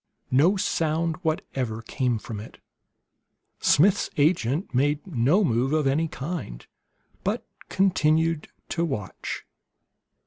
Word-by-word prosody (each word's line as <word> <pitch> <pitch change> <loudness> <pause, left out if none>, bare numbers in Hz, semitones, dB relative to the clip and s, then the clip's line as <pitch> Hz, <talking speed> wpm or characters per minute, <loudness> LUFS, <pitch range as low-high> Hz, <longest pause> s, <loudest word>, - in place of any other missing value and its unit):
No 160 +10 +4
sound 165 -2 0
whatever 130 -9 -2
came 125 0 0
from 110 -1 -7
it. 110 - -10 1.0
Smith's 195 +7 +4
agent 145 - +1
made 145 +3 +1
no 160 - +2
move 130 -1 +1
of 155 -2 +2
any 145 +5 +2
kind, 140 - -6 0.6
but - - -1 0.2
continued 165 -4 +2 0.2
to 170 - 0
watch. 130 - -4
150 Hz, 105 wpm, -25 LUFS, 130-165 Hz, 1.0 s, No